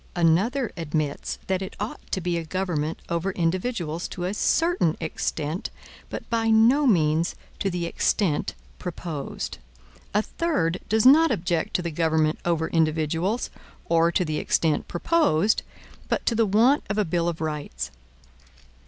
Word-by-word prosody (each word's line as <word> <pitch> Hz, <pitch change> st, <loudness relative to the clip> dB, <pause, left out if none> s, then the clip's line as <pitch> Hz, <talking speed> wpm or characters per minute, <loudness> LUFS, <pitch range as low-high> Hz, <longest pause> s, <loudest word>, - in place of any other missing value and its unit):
Another 195 Hz, +10 st, +2 dB
admits 155 Hz, -3 st, -2 dB
that 190 Hz, 0 st, 0 dB
it 190 Hz, -, -6 dB
ought 210 Hz, +3 st, -4 dB
to -, -, 0 dB
be 175 Hz, -1 st, -1 dB
a 170 Hz, -, -1 dB
government 165 Hz, -2 st, -2 dB
over 170 Hz, +3 st, -1 dB
individuals 175 Hz, -1 st, -1 dB
to 175 Hz, -, -6 dB
a 185 Hz, +2 st, -1 dB
certain 210 Hz, -, +2 dB
extent, 160 Hz, 0 st, -3 dB, 0.4 s
but -, -, -6 dB
by 225 Hz, -1 st, +1 dB
no 235 Hz, +6 st, +5 dB
means 165 Hz, -5 st, +2 dB, 0.2 s
to 195 Hz, -, 0 dB
the 175 Hz, -2 st, -2 dB
extent 170 Hz, -2 st, 0 dB, 0.2 s
proposed. 165 Hz, -5 st, -5 dB, 0.6 s
A 210 Hz, -, +4 dB
third 185 Hz, -, -1 dB
does 220 Hz, +2 st, +3 dB
not 315 Hz, +5 st, +8 dB
object 170 Hz, -1 st, -1 dB
to 180 Hz, -, +1 dB
the 170 Hz, -, -2 dB
government 160 Hz, -1 st, +1 dB
over 165 Hz, -2 st, +1 dB
individuals, 160 Hz, +7 st, 0 dB, 0.3 s
or 165 Hz, 0 st, +3 dB
to 180 Hz, -, +1 dB
the 155 Hz, -1 st, -1 dB
extent 155 Hz, -3 st, +1 dB
proposed, 210 Hz, -, +2 dB, 0.5 s
but -, -, -1 dB
to -, -, +2 dB
the 225 Hz, -1 st, +2 dB
want 230 Hz, +8 st, +4 dB
of 205 Hz, -, -1 dB
a 210 Hz, -, +2 dB
bill 170 Hz, 0 st, 0 dB
of 170 Hz, -, -5 dB
rights. 145 Hz, -, -4 dB
175 Hz, 150 wpm, -25 LUFS, 160-210 Hz, 0.6 s, not